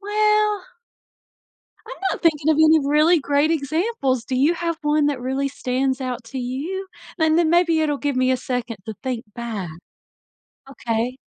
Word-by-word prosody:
well 425 -1 +1 1.2
I'm - - -8
not - - -5
thinking 315 -2 +2
of 310 - +3
any 315 -2 +5
really 305 +3 +4
great 285 +2 +1
examples. 310 - -1
Do 260 - -4
you 290 +6 +3
have 335 -1 -2
one 295 0 +2
that 285 -3 -1
really 265 +2 -1
stands 260 0 -1
out 250 -2 -4
to 260 +3 -7
you? 290 +11 -4 0.3
And 320 0 +3
then 335 -2 +3
maybe 340 -2 +3
it'll 295 -2 0
give 285 -2 -2
me 255 0 +2
a 260 - +3
second 245 -2 -4
to 220 - -5
think 250 -3 -3
back. 225 -7 -5 1.0
Okay. 240 -1 -2
290 Hz, 165 wpm, -22 LUFS, 255-330 Hz, 1.2 s, any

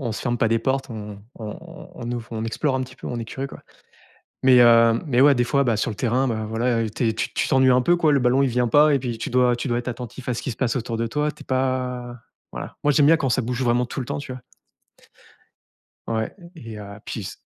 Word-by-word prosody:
on 120 -3 -2
se - - -5
ferme 120 0 -1
pas 115 - +2
des 115 +1 +2
portes. 130 +3 -1
On 105 -2 -7 0.2
on 110 - -7 0.2
on - - -12
on 120 +1 -5
ouv 120 -2 -5
on 110 0 -3
explore 130 +5 -1
un 130 - 0
petit 130 - -9
peu. - - -9
On 120 - -3
est 115 - -4
curieux, 135 +4 -5
quoi. - - -11 0.8
Mais 130 -1 +7
heu, 115 -1 +6
mais 125 -3 +3
ouais, 145 +1 +7
des 120 - +2
fois, 140 +2 +2
bah, 115 -5 +1
sur 110 - 0
le - - -7
terrain, 125 +4 +1
bah, 110 -3 -2
voilà, 115 0 0
tu 115 +3 -1
es - - -1
tu 115 - -3
tu - - 0
t'ennuies 130 -1 +4
un 125 0 +4
peu, 175 +8 +3
quoi, 160 -3 +2
le 140 - +3
ballon 125 +2 +3
il 135 - +2
vient 125 0 +1
pas 145 +5 +5
et 140 - +2
puis, 120 -3 -4
tu - - -4
dois 125 -1 +3
tu 120 - -4
dois 120 - +1
être 120 - -5
attentif 125 +1 -7
à 125 - 0
ce 115 - -4
qui 130 - -3
se 115 - -9
passe 130 -2 0
autour 115 -2 -3
de 115 0 -1
toi, 150 +5 -1
tu - - -14
es - - -25
pas 125 -2 -2 0.3
voilà. - - -7
Moi 150 - +4
j'aime 145 0 +4
bien 165 +3 +6
quand 135 -3 -1
ça 125 - +1
bouge 125 +2 -3
vraiment 120 0 +2
tout 125 - -6
le - - -6
temps, - - -3
tu 140 -2 -6
vois? 125 - -10 1.7
Ouais, 110 -1 -2 0.2
et 115 -8 -9
heu, 100 0 -9
puis 110 - -5
c - - -7
125 Hz, 280 wpm, -23 LUFS, 115-130 Hz, 1.7 s, Mais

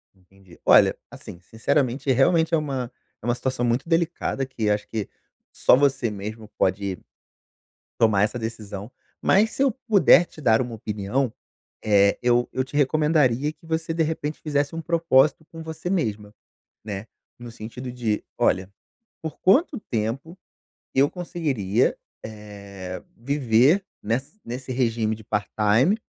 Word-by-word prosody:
Entendi. 95 -1 -20
Olha, - - +6
assim, 85 - -11
sinceramente, 130 +6 0
realmente 160 +6 +3
é - - +5
uma 135 -5 -3 0.3
é - - -10
uma 120 0 +1
situação 125 -1 -2
muito 120 +6 0
delicada 165 -5 0
que 115 -5 -2
acho 105 0 0
que 110 -3 -4 0.4
só - - +5
você 135 -5 +1
mesmo 105 +2 -7
pode 95 0 0 1.0
tomar 105 -3 +4
essa 110 +4 0
decisão, 110 -2 -6 0.3
mas 215 +3 +3
se 270 - -1
eu 270 -4 +3
puder 215 -7 +5
te 160 - -15
dar 115 -3 +4
uma 120 -2 -6
opinião, 110 +3 -2 0.5
eh, 100 -1 +4
eu 120 0 +2
eu 130 - -1
te 140 +2 -8
recomendaria 150 -1 +2
que 165 - -21
você 160 0 -2
de 165 0 +1
repente 155 -1 -3
fizesse 145 +2 -1
propósito 155 -3 +3
com 165 0 -8
você 160 +2 -5
mesma, 105 - -2 0.5
né. 105 0 -6 0.3
No 120 -1 -9
sentido 120 +3 -8
de: 115 -4 -2
"Olha, 95 +1 +1 0.5
por 160 -2 -6
quanto 260 - +3
tempo 125 - -3 0.6
eu 140 +2 +4
conseguiria, 140 - -1 0.3
eh, 100 -3 -8 0.2
viver 135 - +3 0.2
nessa 130 - -2
nesse 130 +2 -6
regime 115 -3 0
de 110 - -13
part-time, 105 - +1
125 Hz, 140 wpm, -24 LUFS, 110-155 Hz, 1.0 s, Olha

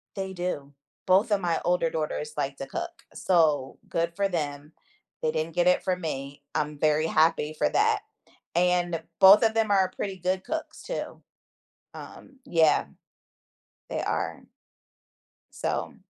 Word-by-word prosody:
They 190 -1 -4
do. 175 -6 -4 0.3
Both 190 +4 +3
of 205 -1 +2
my 170 -2 0
older 175 -2 +2
daughters 150 -1 -3
like 140 -2 -2
to 135 - -6
cook, 345 - -4 0.2
so 155 -7 +2
good 170 0 -1
for 200 +1 +1
them. 150 -4 -4 0.5
They 155 - +1
didn't 160 +1 -3
get 175 0 +2
it 180 - +4
from 185 -1 -1
me, 140 -3 -5
I'm 150 0 -2
very 155 +1 +2
happy 155 -1 +2
for - - +2
that, 425 0 +2 0.5
and 175 -1 +1 0.2
both 195 +3 +9
of 225 -1 +4
them 225 -2 +1
are 190 -2 +3
pretty 195 -2 -4
good 185 +1 -1
cooks 320 0 -5
too. - - -5 0.7
Um, 270 -1 -12
yeah 165 - +3 1.0
they - - -2
are. - - -2 1.2
So - - -2
175 Hz, 145 wpm, -27 LUFS, 155-190 Hz, 1.2 s, both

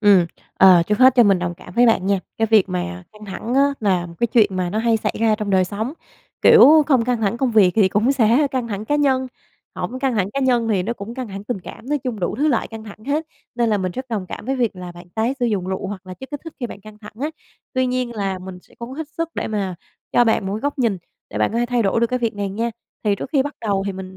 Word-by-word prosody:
ừm, 200 -5 +5 0.3
ờ, 185 -3 +7
trước 210 +1 0
hết 260 0 +7
cho 245 - +7
mình 200 -4 +4
đồng 175 -1 -3
cảm 180 - -13
với 245 +1 +5
bạn 210 -5 +2
nha, 195 -2 +2 0.2
cái 225 - +2
việc 220 -3 +4
mà 90 0 -4
căng 210 0 -13
thẳng 220 +4 -5
á, 280 +1 +4
là 185 -5 +1
một 170 - -11
cái 235 - +2
chuyện 215 -5 +3
mà 180 -1 -1
nó 215 - -1
hay 230 0 +2
xảy 220 - -2
ra 220 -1 +3
trong 210 -2 -3
đời 185 -1 +4
sống. 220 +8 -4 0.5
Kiểu, 315 - +8
không 260 -6 +3
căng 245 0 0
thẳng 210 +1 0
công 255 0 0
việc 200 -5 +6
thì 205 -4 +4
cũng 215 +7 +2
sẽ 245 +3 +3
căng 255 -3 -2
thẳng 205 0 -4
cá 290 - +1
nhân, 265 -3 +2 0.5
hổng 255 - -4
căng 265 -1 0
thẳng 200 -2 0
cá 275 - -2
nhân 245 -3 +2
thì 200 -5 +1
nó 225 +6 -2
cũng 225 +1 -8
căng 255 -3 -5
thẳng 195 +1 -7
tình 215 -3 -3
cảm, 230 - -11
nói 295 0 +1
chung 240 -6 -5
đủ 175 - -1
thứ 305 +2 +2
loại 240 - 0
căng 225 -1 -9
thẳng 215 +1 -12
hết, 305 +3 -1 0.3
nên 235 -1 +1
là 210 - +2
mình 185 -2 -2
rất 260 +5 -6
đồng 205 -6 -3
cảm - - -8
với 270 +3 -1
việc 235 -6 0
là 180 -1 -7
bạn 175 0 -13
tái 225 +4 0
sử 245 - +2
dụng 205 -5 -1
rượu 190 +1 -3
hoặc 190 -1 -7
là 185 - -7
chất 265 +9 -11
kích 290 -2 -5
thích 325 - -8
khi 245 - -1
bạn 205 - -10
căng 215 +1 -13
thẳng 210 -1 -12
á. 300 - -1 0.4
Tuy 255 -1 +1
nhiên 250 -1 -2
là 195 -2 -2
mình 185 0 -9
sẽ - - -23
cố 235 +2 -7
hết 305 +2 -6
sức 330 +1 -4
để - - -3
mà 200 -4 -2 0.4
cho 240 - +5
bạn 225 -4 +1
một 195 - -2
cái 215 - -4
góc 285 +2 -2
nhìn 225 -7 +1 0.3
để 105 - -4
bạn 105 - +1
có 230 - 0
thể 240 - +1
thay 240 -1 +1
đổi 205 +3 +1
được 235 - +3
cái 250 +2 -1
việc 230 -3 -1
này 200 -1 -3
nha. 230 +4 -2 0.3
Thì 205 -1 +3
trước 200 - -7
khi 280 -3 +4
bắt 290 +2 -6
đầu 200 -3 0
thì 200 - -2
mình 190 0 -9
220 Hz, 300 wpm, -21 LUFS, 195-250 Hz, 0.5 s, Kiểu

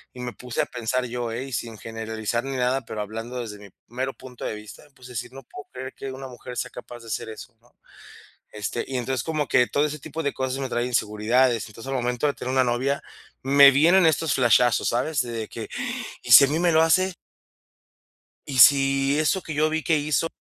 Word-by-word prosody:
Y - - -10
me 125 0 -4
puse 125 +3 -3
a - - 0
pensar 125 +1 -2
yo 120 -1 -4
ey, 130 +4 -5
sin 115 -1 -4
generalizar, 110 +1 -4
ni 135 0 -4
nada, 130 +2 +1
pero 110 - -5
hablando, 115 +4 -6
desde 110 -4 -6
mi 100 - -13 0.2
mero 130 +3 -3
punto 125 -2 -10
de - - -2
vista. 105 0 -11
Me 145 - -22
puse 125 -1 -14
a - - -10
decir: 120 +1 -5
"No 135 -1 -10
puedo 145 - -11
creer, 130 +1 -7
que 135 - -6
una 135 0 -7
mujer 125 0 -10
sea 125 - -3
capaz 120 0 -10
de 115 - -13
hacer 110 0 -4
eso", 115 +2 -10
¿no? 120 - -28 0.8
Este, 105 +2 -4
y 135 - -4
entonces, 130 +1 -2
como 155 -2 -2
que 125 -1 +4
todo 145 +1 +1
ese 150 +1 -5
tipo 160 +4 -6
de 140 - -1
cosas, 130 0 -2
me 135 -1 -3
trae 120 0 -1
inseguridades. 115 +1 +1
Entonces, 115 +5 -11
al 135 - -2
momento 125 +2 0
de 145 - 0
tener 125 - -5
una 130 -1 +3
novia, 125 +3 0 0.4
me 140 +1 +7
vienen 165 +7 +5
estos 160 0 +2
flashazos, 120 -1 +3
¿sabes? 145 +5 0
De 115 -3 -5
que: - - -7 0.5
"¿Y, - - -1
si 140 - +11
a 135 - +2
mí 155 - 0
me 175 -1 +2
lo 160 - +5
hace?". 185 +3 +2 1.3
Y 135 - -4
si 135 +1 +5
eso 170 +5 +1
que 160 - -6
yo 155 +2 +2
vi 160 0 -2
que 160 -2 +2
hizo. 150 +1 0
130 Hz, 225 wpm, -24 LUFS, 120-140 Hz, 1.3 s, si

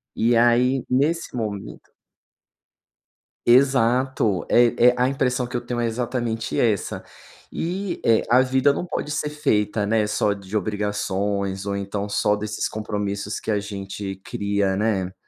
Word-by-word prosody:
E 120 +1 +2
aí, 120 +2 +3
nesse 145 +4 0
momento 105 -4 -5 1.6
Exato, 125 -5 +3
eh 120 0 +5
eh, 125 0 +6
a 125 +1 +3
impressão 130 -2 0
que 125 +1 -7
eu 120 - -1
tenho 120 0 -4
é 120 - +1
exatamente 115 -1 -2
essa. 110 -4 0 0.5
E, 185 +3 -3
eh, 115 -1 +3
a 125 +3 +5
vida 130 +2 +3
não - - -3
pode 150 - -3
ser 150 0 -1
feita, 105 -8 0
né, 105 0 +1
só 105 0 +1
de 100 +1 -4
obrigações 100 -1 -2
ou 100 0 -1
então 100 +1 -4
só 105 0 +2
desses 105 +1 -3
compromissos 105 -1 -3
que 110 - -3
a 105 - +1
gente 100 -1 -6
cria, 100 -1 -1
né? 95 -3 0
110 Hz, 145 wpm, -23 LUFS, 100-125 Hz, 1.6 s, eh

